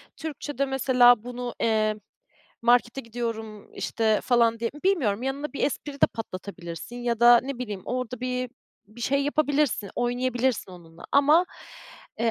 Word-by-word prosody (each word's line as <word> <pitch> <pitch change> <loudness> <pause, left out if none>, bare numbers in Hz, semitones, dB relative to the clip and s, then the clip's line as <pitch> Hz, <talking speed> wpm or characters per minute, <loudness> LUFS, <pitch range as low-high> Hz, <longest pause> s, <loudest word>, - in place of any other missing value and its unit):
Türkçe'de, 290 -3 -3
mesela, 250 -3 +4
bunu, 245 0 -5
eee, 215 -1 +2 0.7
markete 240 +2 +3
gidiyorum, 225 -3 -6
işte, 220 -2 0
falan, 230 -2 +3
di 230 - -1
bilmiyorum, 250 - +1
yanına 280 +3 -3
bir - - -4
espri 290 +1 -3
de 280 - +4
patlatabilirsin 185 -1 -7
ya 240 -1 -2
da 240 0 +8
ne 270 -1 -5
bileyim 210 -7 -5
orada 250 -1 -4
bir 250 -1 -2 0.4
bir 215 +4 -15
şey 275 +4 +1
yapabilirsin, 290 -8 +1
oynayabilirsin 245 -3 -1
onunla 165 -2 -14
ama, 300 +6 +5 0.7
eee, 230 0 +2
245 Hz, 135 wpm, -26 LUFS, 225-270 Hz, 0.7 s, da